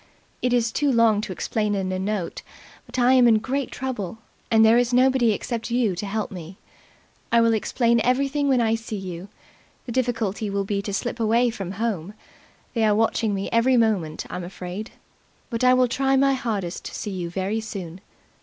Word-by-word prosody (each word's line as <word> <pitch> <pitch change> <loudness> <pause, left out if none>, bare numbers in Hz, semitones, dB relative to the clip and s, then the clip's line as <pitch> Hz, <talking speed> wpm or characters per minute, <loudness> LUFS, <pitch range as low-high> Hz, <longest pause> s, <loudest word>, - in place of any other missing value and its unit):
It's 245 -2 +1
too 290 -2 +1
long 230 -3 +4
to 210 - -5
explain 210 +3 -1
in 190 -1 -2
a 185 - -2
note, 195 -2 -3 0.5
but - - -7
I 250 +1 +4
am 250 -2 +6
in 225 -2 +5
great 265 +4 -2
trouble, 225 -7 -4 0.3
and 225 -2 +5
there 225 +2 +6
is 245 0 +1
nobody 255 -2 +4
except 230 +2 -3
you 235 -5 +1
to 200 +4 -4
help 215 +1 -3
me. 180 0 -9 0.7
I 235 - +5
will 230 0 +4
explain 235 +1 +1
everything 275 +4 +1
when 260 -3 +3
I 225 -1 +2
see 225 -1 -4
you. 185 -1 -7 0.6
The 245 - -6
difficulty 225 -4 -1
will 200 0 -1
be 200 0 -1
to 200 - -5
slip 240 +4 -3
away 230 +2 +3
from 195 -5 -6
home. 205 -3 -3 0.6
They 230 -2 +1
are 210 -1 +4
watching 220 -1 +1
me 195 0 -3
every 245 +2 +3
moment, 195 -9 0
I'm 180 - -5
afraid. 185 +3 -6 0.6
But 230 +1 -2
I 255 0 +6
will 255 0 +4
try 270 +2 +1
my 275 0 +4
hardest 210 -9 -3
to - - -7
see 210 - -4
you 180 -3 -4
very 195 +5 -2
soon. 190 -5 -7
225 Hz, 190 wpm, -24 LUFS, 195-245 Hz, 0.7 s, am